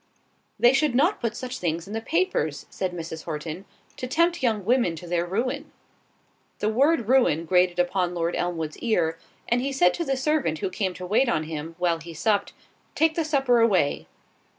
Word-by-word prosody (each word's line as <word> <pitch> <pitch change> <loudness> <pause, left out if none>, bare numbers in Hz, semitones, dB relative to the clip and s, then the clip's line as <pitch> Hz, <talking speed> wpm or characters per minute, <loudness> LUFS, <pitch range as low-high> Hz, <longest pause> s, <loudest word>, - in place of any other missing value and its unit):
_'" - - -41 0.6
"They 240 +2 +6
should 280 -2 +2
not 335 +11 +2
put 230 -2 -2
such 255 0 -5
things 170 -1 -2
in 205 - -8
the 225 - -2
papers," 320 - -1
said 185 -1 -2
Mrs. 160 -2 -7
Horton, 160 +3 -5 0.3
"to 255 - -4
tempt 335 +5 +1
young 220 -6 0
women 235 -7 +2
to 165 - -9
their 175 0 -1
ruin." 255 - -2 0.9
The 210 - 0
word 270 +2 +2
ruin 230 - +3
grated 180 0 +3
upon 180 0 0
Lord 170 0 -1
Elmwood's 165 -3 -3
ear, 170 -8 0 0.3
and 240 +1 +2
he 275 +2 -2
said 180 -10 +3
to 340 - -2
the 270 -4 -1
servant 270 - 0
who 185 - -3
came 185 -1 -2
to 185 - -7
wait 220 +7 +2
on 155 - +1
him, 160 +1 -6
while 175 -2 +1
he 165 0 -10
supped, 205 +4 0 0.4
"Take 320 +1 +3
the 330 - 0
supper 270 -6 +2
away." 195 -10 +2
200 Hz, 195 wpm, -25 LUFS, 170-260 Hz, 0.9 s, They